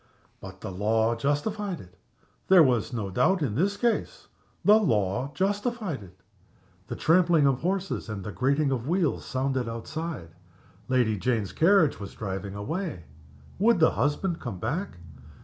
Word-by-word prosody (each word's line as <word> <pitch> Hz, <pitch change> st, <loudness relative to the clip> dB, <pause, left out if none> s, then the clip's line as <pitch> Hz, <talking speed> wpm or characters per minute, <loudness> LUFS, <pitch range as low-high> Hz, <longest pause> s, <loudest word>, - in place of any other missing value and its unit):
But 95 Hz, 0 st, -11 dB
the 100 Hz, -, -5 dB
law 110 Hz, +4 st, +1 dB
justified 175 Hz, -, -2 dB
it. 90 Hz, 0 st, -14 dB, 0.5 s
There 185 Hz, -3 st, +8 dB
was 125 Hz, -5 st, +1 dB
no 105 Hz, -6 st, -3 dB
doubt 160 Hz, -, +2 dB
in 120 Hz, -8 st, -1 dB
this 195 Hz, -, 0 dB
case. 240 Hz, -, -1 dB, 0.4 s
The 210 Hz, +1 st, +8 dB
law 115 Hz, -, 0 dB
justified 205 Hz, -, -1 dB
it. 95 Hz, -1 st, -15 dB, 0.7 s
The -, -, -5 dB
trampling 165 Hz, -2 st, +4 dB
of 135 Hz, -2 st, +2 dB
horses 190 Hz, -5 st, -2 dB
and 100 Hz, -3 st, -5 dB
the 105 Hz, -, -5 dB
grating 140 Hz, +5 st, +1 dB
of 125 Hz, -1 st, -2 dB
wheels 175 Hz, -1 st, 0 dB
sounded 130 Hz, -2 st, -1 dB
outside. 140 Hz, -, -5 dB, 0.6 s
Lady 120 Hz, -5 st, +1 dB
Jane's 115 Hz, -3 st, -1 dB
carriage 170 Hz, -2 st, +4 dB
was 100 Hz, -, -8 dB
driving 100 Hz, -1 st, -5 dB
away. 155 Hz, -, -4 dB, 0.6 s
Would 225 Hz, 0 st, +4 dB
the 160 Hz, -, +5 dB
husband 165 Hz, +4 st, -1 dB
come 95 Hz, -, -6 dB
back? 150 Hz, -, -3 dB
140 Hz, 150 wpm, -27 LUFS, -, 0.7 s, There